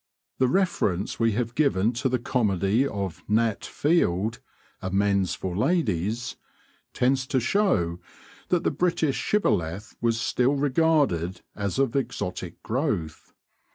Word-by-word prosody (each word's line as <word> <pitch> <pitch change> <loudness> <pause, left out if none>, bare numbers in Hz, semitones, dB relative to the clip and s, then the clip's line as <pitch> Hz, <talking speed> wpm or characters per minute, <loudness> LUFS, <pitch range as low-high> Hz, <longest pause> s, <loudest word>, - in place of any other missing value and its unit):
The 130 - +4
reference 125 - 0
we 115 -2 +3
have 115 +1 -2
given 120 -7 +2
to 130 +3 -1
the 125 - +1
comedy 110 0 +1
of 100 -8 -4
Nat 110 0 +1
Field, 115 - +1 0.4
'Amends 100 0 +1
for 90 -2 -4
Ladies,' 110 - 0 0.5
tends 130 +1 +1
to 135 -2 +1
show 120 - +1 0.5
that 175 -1 +2
the - - +1
British 165 -5 0
shibboleth 100 - 0
was 115 -1 +1
still 125 +4 +1
regarded 140 - +1
as 100 +1 -2
of 135 -2 +1
exotic 125 -8 -3
growth. 110 - -2
115 Hz, 120 wpm, -26 LUFS, 95-135 Hz, 0.5 s, The